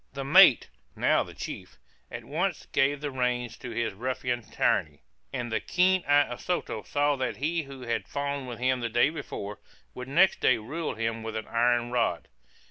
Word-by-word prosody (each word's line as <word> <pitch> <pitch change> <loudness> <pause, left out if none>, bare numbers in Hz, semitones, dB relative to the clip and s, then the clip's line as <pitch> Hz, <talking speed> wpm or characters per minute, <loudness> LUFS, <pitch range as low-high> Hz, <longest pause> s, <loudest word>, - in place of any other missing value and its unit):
The 135 0 -4
mate 165 -1 +7 0.3
(now - - +3
the - - -8
chief) - - -7 0.3
at - - -8
once - - -2
gave 140 +1 +2
the 145 -1 -3
reins 125 -2 -1
to 125 - -8
his 115 -1 -2
ruffian 125 +2 -2
tyranny; 75 -7 -1 0.3
and 120 -1 -4
the 110 - +1
keen 185 +1 +2
eye 145 0 +5
of 125 - -8
Soto 175 -11 -2
saw 145 +3 +1
that 130 -1 -2
he 165 +5 0
who 135 -3 -10
had 115 -2 -2
fawned 140 -1 -3
with 120 -2 -6
him 130 +1 +1
the 120 -1 -2
day 120 +6 +3
before, 105 -10 -6 0.3
would 125 0 -7
next 175 +8 +4
day 125 - +4
rule 145 +9 -4
him 115 0 -2
with 110 0 -6
an 110 - -4
iron 120 +1 +1
rod. 115 -9 0
125 Hz, 190 wpm, -28 LUFS, 115-145 Hz, 0.3 s, mate